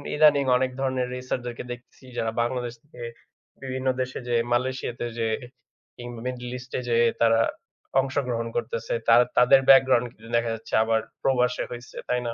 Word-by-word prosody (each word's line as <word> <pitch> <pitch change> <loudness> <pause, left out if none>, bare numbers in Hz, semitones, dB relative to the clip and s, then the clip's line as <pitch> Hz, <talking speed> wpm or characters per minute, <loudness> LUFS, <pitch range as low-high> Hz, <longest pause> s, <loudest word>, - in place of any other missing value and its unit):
ইদানিং 150 -2 +5
অনেক 130 0 0
ধরনের 130 -2 0
racer 125 0 -3
দেরকে 120 -1 -5
দেখতেছি 120 +2 -11
যারা 110 - 0
বাংলাদেশ 120 0 -2
থেকে 145 -4 -14 0.6
বিভিন্ন 130 0 -3
দেশে 130 0 -3
যেয়ে, 120 -1 +2
মালয়েশিয়াতে 125 -1 -1
যেয়ে, 110 -1 0 0.6
কিংবা 120 -1 -8
middle 125 -1 -5
east 125 +1 -12
এ - - -1
যেয়ে 120 0 +4
তারা 115 -1 +5 0.6
অংশগ্রহণ 125 -4 -2
করতেছে। 115 -1 -2
তা 115 - +7 0.2
তাদের 125 +2 +7
background 130 -2 +6
কিন্তু 115 0 -15
দেখা 115 0 0
যাচ্ছে 110 - -13
আবার 110 0 +2 0.2
প্রবাসে 125 -1 +1
হইছে, 120 0 -9
তাই 125 - +2
না? 115 - -2
125 Hz, 160 wpm, -25 LUFS, 115-130 Hz, 0.6 s, তা